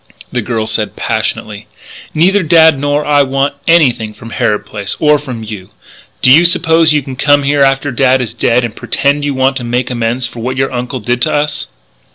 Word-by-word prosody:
The 125 - -1
girl 110 -1 -2
said 110 -1 -2
passionately: 105 0 -3 0.5
"Neither 190 +6 +3
Dad 160 -3 +4
nor 145 +1 -1
I 145 -1 +3
want 135 +1 0
anything 125 -10 +2
from 115 - -11
Harrod 110 -4 -1
Place 100 -2 -5
or 150 -1 +3
from 125 -6 -7
you! 105 -4 -8 0.5
Do 130 - +5
you 160 +6 +7
suppose 165 -2 +3
you 150 -2 +1
can 130 0 -7
come 145 +2 +2
here 140 +1 +1
after 135 +1 +2
Dad 130 +1 +2
is 115 -3 -4
dead 120 +1 +1
and 115 - -7
pretend 140 +1 -1
you 145 -2 -2
want 135 +1 +1
to 125 - -5
make 120 +2 -2
amends 120 +1 -1
for 120 - -7
what 130 +3 -4
your 135 0 0
uncle 125 0 -4
did 120 +3 -2
to - - +1
us?" 150 0 -1
130 Hz, 205 wpm, -13 LUFS, 120-145 Hz, 0.5 s, you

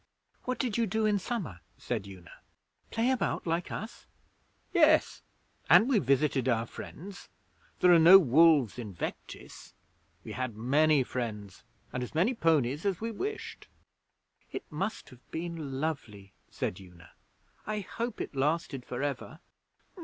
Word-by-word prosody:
'What 255 0 -2
did 240 -4 -1
you 230 - +2
do 220 +3 0
in 210 -1 +2
summer?' 185 - -4 0.2
said 100 - -4
Una. 90 -3 -12 0.6
'Play 235 +3 +1
about, 260 - -1
like 170 +1 -1
us?' 230 +2 -7 0.7
'Yes, 315 -3 +4 0.5
and 225 - +7
we 260 -6 +3
visited 135 -2 +1
our 115 -1 +1
friends. 190 - -10 0.5
There 180 -1 +7
are 170 - +7
no 170 +4 +10
wolves 150 - +4
in 105 -6 -7
Vectis. - - -8 0.5
We - - -8
had 130 -4 -4
many 140 +5 +3
friends, 105 -7 -5 0.3
and 125 - -2
as 125 - -6
many 190 +11 +3
ponies 155 - +1
as 195 -4 0
we 230 +1 -3
wished.' 415 - -5 0.8
'It - - -5
must 190 +8 -4
have 125 -3 -18
been 160 -5 -5
lovely,' 110 -11 -4 0.2
said 90 - -4
Una. 90 -2 -15 0.6
'I 210 0 -2
hope 235 +3 -5
it - - -6
lasted 145 -1 -1
for 125 +2 -5
ever.' 145 +3 -4
155 Hz, 145 wpm, -30 LUFS, 125-205 Hz, 0.8 s, no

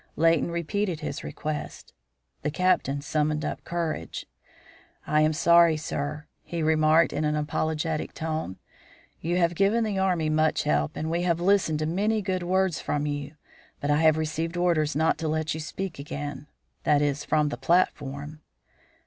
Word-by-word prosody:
Leighton 165 +1 +3
repeated 170 +1 -2
his - - -4
request. 150 -1 -5 0.5
The 150 - -1
Captain 150 -5 +1
summoned 150 +1 0
up - - -4
courage. 165 - -3 0.8
"I 150 0 +2
am 155 0 +4
sorry, 170 0 +5
sir," 150 0 -4 0.2
he 170 -2 -4
remarked, 155 +1 +4
in - - -1
an 150 0 +1
apologetic 155 +1 -2
tone. 160 - -3 0.6
"You 175 +2 -1
have 170 -1 +2
given 200 +6 +2
the 205 -3 -1
Army 180 -4 +1
much 155 0 +2
help, 75 0 0
and 160 +1 -3
we 170 +1 0
have 170 -2 +1
listened 180 -4 +2
to 155 - -1
many 205 +6 0
good 185 -1 -1
words 185 -1 +1
from 145 0 -1
you, 145 0 -4 0.4
but 145 - -1
I 145 - +4
have 160 -1 +5
received 160 +2 -2
orders 165 -4 +1
not 160 +2 +2
to 160 - -2
let 155 +1 -1
you 160 - -5
speak 170 +2 -5
again; 145 0 -6 0.3
that 145 0 +3
is, 145 0 0
from 150 -1 +1
the - - -3
platform." 150 -3 0
155 Hz, 165 wpm, -26 LUFS, 150-170 Hz, 0.8 s, sorry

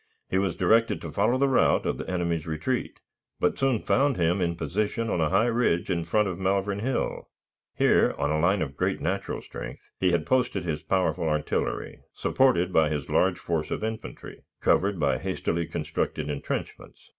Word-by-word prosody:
He 95 - +2
was 95 -3 0
directed 115 -1 +3
to 80 - -6
follow 120 - +2
the 140 +1 +3
route 130 - +3
of - - -1
the - - -5
enemy's 85 -3 -1
retreat, 80 +11 -2 0.4
but - - +1
soon 135 -5 +1
found 140 -1 +2
him 90 +2 +1
in 85 -1 0
position 105 - -2
on 85 - 0
a 75 - +2
high 100 +7 +3
ridge 115 -7 +1
in 85 -2 -1
front 105 +5 +2
of 90 -2 -4
Malvern 100 +1 0
Hill. 125 +4 -2 0.5
Here, - - +4
on 75 - 0
a 75 - +1
line 90 +3 +2
of 70 -2 -6
great - - 0
natural - - -2
strength, - - -8 0.2
he 90 -1 +3
had 85 -3 +1
posted 125 -8 +1
his 80 -3 -2
powerful 80 0 0
artillery, 75 0 -2 0.2
supported 95 -9 +2
by 80 -2 +4
his 75 -2 -3
large 95 0 +3
force 80 -2 -2
of - - -3
infantry, 110 - -6 0.2
covered 100 -1 +2
by 70 -4 +1
hastily 85 0 -2
constructed 75 -1 -2
intrenchments. 70 - -6
90 Hz, 180 wpm, -26 LUFS, 80-110 Hz, 0.5 s, Here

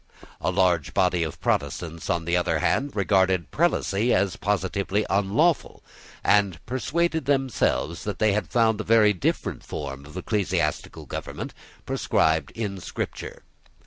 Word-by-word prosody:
A - - 0
large 90 -4 +1
body 90 -1 +2
of 80 -3 -3
Protestants, 85 -1 -2
on 85 -1 0
the 85 +1 +1
other 90 - +1
hand, 140 -2 0
regarded 95 -5 +2
prelacy 105 +6 +2
as 95 -1 +1
positively 100 +1 -1
unlawful, 105 - +1 0.4
and 100 -4 +3
persuaded 160 +5 -1
themselves 135 - 0
that 105 - -3
they 110 -2 +3
found 110 -2 +1
a - - -4
very 110 -1 +5
different 90 - -2
form 70 -1 -6
of 75 - -10
ecclesiastical 100 +1 -1
government - - -6 0.3
prescribed 80 -3 +1
in 100 -4 -3
Scripture. - - -6
100 Hz, 130 wpm, -25 LUFS, 85-110 Hz, 0.4 s, very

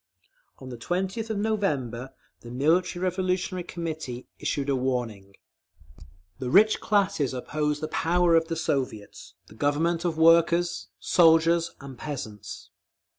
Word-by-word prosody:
On 130 - -10
the 120 -2 -8
20th 190 - -2
of 220 - -2
November 145 - -2 0.2
the 120 - -12
Military 170 +8 +1
Revolutionary 185 0 -1
Committee 160 -8 -6
issued 140 -1 -2
a 140 - +1
warning: 120 -7 -3 1.0
The 130 -2 -3
rich 210 +8 +5
classes 195 - +1
oppose 150 +3 -2
the 155 - -2
power 175 +2 +2
of 165 0 +3
the 165 - -3
Soviets—the 130 -10 -4
Government 155 +7 0
of 170 -3 -1
workers, 170 +1 +3
soldiers 165 0 +4
and 135 -3 -10
peasants. 110 -9 -7
160 Hz, 125 wpm, -26 LUFS, 130-175 Hz, 1.0 s, rich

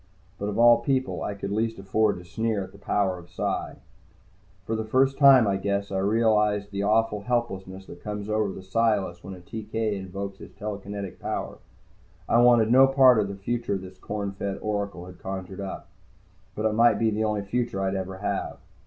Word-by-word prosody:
But 100 - -2
of 105 - -4
all 120 0 +7
people, 130 +2 -1
I 105 - -3
could 100 0 -5
least 110 +2 -1
afford 105 +2 +1
to 90 - -11
sneer 110 +3 -1
at 95 - -10
the 100 - -16
power 95 -2 0
of 85 - -15
Psi. - - -3 0.9
For 115 - -1
the 110 - -2
first 130 +5 +2
time, 135 -4 +8
I 100 -1 +1
guess, 100 0 -2
I 95 - -1
realized 105 -1 +2
the 100 0 -3
awful 105 0 +2
helplessness 95 -5 -3
that 85 - -12
comes 105 -1 -5
over 110 -2 0
the 95 - -9
Psiless 95 -3 0
when 95 0 -7
a - - -12
TK 110 +3 -3
invokes 100 0 -6
his - - -12
telekinetic 100 -2 -6
power. - - -4 0.7
I 120 - +4
wanted 120 -2 +5
no 135 +2 +7
part 130 -3 +6
of 105 - +1
the 100 - -6
future 115 +1 -2
this 95 0 -11
corn 100 -1 -4
fed 100 0 -4
oracle 100 -4 -3
had 90 0 -12
conjured 95 0 -6
up. 95 - -6 0.7
But 105 - -2
it 110 - +2
might 115 +1 +4
be 115 -1 +2
the 110 +1 -1
only 105 -2 -1
future 115 0 -2
I'd 95 0 0
ever 95 0 -4
have. 100 - -3
105 Hz, 195 wpm, -26 LUFS, 95-115 Hz, 0.9 s, time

